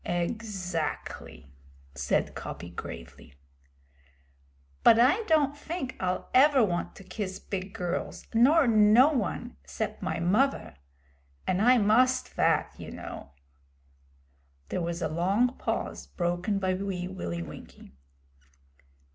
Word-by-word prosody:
'Exactly,' 175 - -4 0.4
said 70 0 0
Coppy 85 - -7
gravely. 70 -4 -9 1.5
'But 225 - +7
I 260 - +4
don't 295 -5 +2
fink 290 -3 -5
I'll 180 -1 -2
ever 270 0 +6
want 175 -3 -3
to - - -12
kiss 190 0 -5
big 190 0 -5
girls, 180 -3 -4
nor 280 +7 +5
no 220 +4 +6
one, 240 - -3
'cept 70 - -5
my - - -2
muvver. 205 - +1 0.7
And 185 +1 0
I 250 +3 +6
must 245 +4 +3
vat, - - +1
you - - -8
know.' 70 - -8 1.4
There - - -2
was 170 +1 -3
a - - +1
long 195 - +1
pause, - - -3
broken 175 +3 -1
by 190 -1 0
Wee 185 -1 -3
Willie 85 - -4
Winkie. - - -12
195 Hz, 115 wpm, -28 LUFS, 175-250 Hz, 1.5 s, But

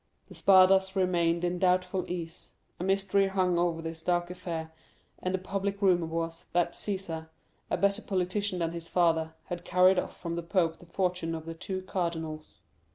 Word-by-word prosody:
The - - -11
Spadas 190 0 +5
remained 175 -2 +2
in 175 0 -1
doubtful 185 0 +1
ease, 165 -2 -5 0.3
a - - -3
mystery 195 +1 +2
hung 185 -2 +1
over 170 -2 0
this 165 0 -5
dark 175 +1 0
affair, 165 -3 -5 0.5
and 185 - -2
the 190 - +1
public 195 +1 -3
rumor 180 -4 +3
was, 165 0 -4
that 175 0 +2
Cæsar, 170 -6 -3 0.4
a - - +1
better 200 +2 +2
politician 190 0 -1
than 165 -2 -1
his 170 -1 -6
father, 160 -2 +2
had 175 -1 -6
carried 180 +1 +5
off - - -5
from 170 -1 -4
the - - -1
pope 170 -2 0
the 175 - -15
fortune 180 -2 -1
of 160 -1 -7
the 165 - -5
two 185 +3 -5
cardinals. 165 -4 -3
180 Hz, 175 wpm, -29 LUFS, 165-190 Hz, 0.5 s, Spadas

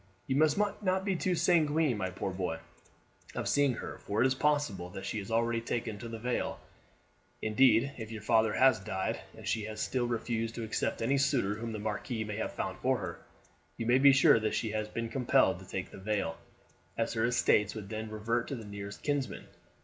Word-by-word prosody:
You 135 - -1
must 155 +3 +4
not 200 -2 0
be 195 -2 +1
too 180 +1 0
sanguine, 155 -5 +3
my 95 -3 -2
poor 95 +1 -4
boy, 90 -3 -2 0.8
of - - -2
seeing 140 -3 +3
her, - - -7
for 105 +2 -3
it 120 - +5
is 130 - +3
possible 145 -11 0
that 95 +2 -7
she 110 - -2
has 100 - -7
already 115 0 +1
taken 115 -2 -3
the 115 +1 -6
veil. 125 +2 -2 0.8
Indeed, 115 +3 +4
if 110 -1 -6
your 110 -2 -7
father 110 -1 +3
has 130 -4 +5
died, 95 0 -2 0.2
and - - -9
she 110 -2 0
has 110 0 -6
still 125 +1 0
refused 115 -1 -2
to 115 - -4
accept 110 +1 -1
any 135 +4 +2
suitor 135 -7 +2
whom 115 +2 -5
the 110 - -4
marquis 110 +2 -3
may 105 -1 -5
have - - -3
found 95 0 -4
for 130 0 +2
her, 95 -5 -6 0.6
you 115 - -3
may 125 +3 +4
be 140 +1 +8
sure 135 -3 +6
that 110 0 -1
she 110 - -1
has 110 0 -2
been 115 +1 -3
compelled 125 0 +2
to - - -13
take - - -4
the - - -10
veil, 100 -5 -1 0.6
as 115 0 0
her 110 0 +1
estates 105 -4 +3
would 105 -3 -7
then 110 0 -4
revert 115 +3 -1
to 140 - -3
the 115 -3 -8
nearest 100 0 -7
kinsman. 145 -3 -2
115 Hz, 210 wpm, -31 LUFS, 105-130 Hz, 0.8 s, be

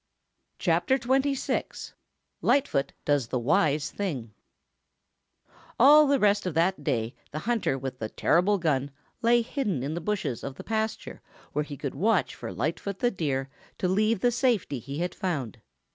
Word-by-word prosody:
CHAPTER 265 - +2
XXVI 270 +2 -1 0.5
LIGHTFOOT 145 - +2
DOES 145 -5 +2
THE 125 - -1
WISE 145 +4 +1
THING 135 - -4 1.5
All 295 +4 +8
the 280 0 +4
rest 205 -4 +2
of 170 - -3
that 170 -1 +1
day 115 -2 -1 0.2
the 150 - -6
hunter 220 - 0
with 130 -1 -6
the 110 - -3
terrible 185 - +2
gun 145 -6 0 0.3
lay 235 0 +4
hidden 210 - -2
in 145 +3 -2
the 170 - -4
bushes 180 - -2
of 135 - -5
the - - -9
pasture 220 0 -3 0.3
where 150 - 0
he 145 -1 -8
could 140 -1 -4
watch 200 +7 +1
for - - -7
Lightfoot 185 +5 -3
the 245 +4 +1
Deer 140 -7 -2 0.3
to 185 - 0
leave 215 +2 +2
the 245 - +4
place - - -3
of - - -2
safety 225 - +1
he 140 +4 -7
had 175 +2 -2
found. 140 - -3
175 Hz, 165 wpm, -27 LUFS, 140-225 Hz, 1.5 s, All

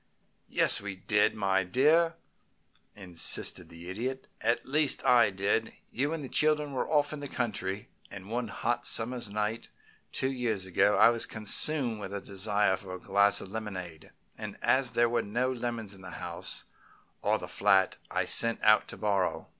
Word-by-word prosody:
"Yes, - - +5
we 100 -1 -6
did, 105 +3 +1
my 95 -2 +1
dear," 155 - +3 0.8
insisted 90 -4 0
the 85 +1 -11
Idiot. 125 +8 -4 0.2
"At 120 - 0
least 150 +1 +1
I 120 -4 +5
did. 100 +3 -1 0.2
You 140 +6 -1
and 165 -2 -4
the - - -6
children 150 0 +1
were 130 - -2
off 145 -1 +2
in 150 - -6
the 145 - -5
country, 105 -6 -3 0.2
and 95 -1 -10
one 120 +2 -3
hot 120 +3 -2
summer's 120 -1 -2
night, 105 +2 -3 0.4
two 130 - -1
years 115 -7 -2
ago, 100 +3 +2
I - - +7
was 115 -1 +1
consumed 115 +3 +1
with 100 -1 -7
a 100 - -3
desire 100 0 0
for 95 -2 -8
a - - -9
glass 100 +2 +2
of 95 - -10
lemonade, 90 -7 -7 0.3
and - - -7
as 130 -1 +2
there 120 0 +3
were 120 0 0
no 120 +5 -1
lemons 120 -4 -4
in 95 - -13
the 95 - -9
house, - - -4 0.6
or - - +1
the - - -8
flat, 95 0 +2
I - - -1
sent 115 -1 +2
out 110 0 +5
to - - -9
borrow. 100 -3 -1
110 Hz, 175 wpm, -29 LUFS, 100-125 Hz, 0.8 s, I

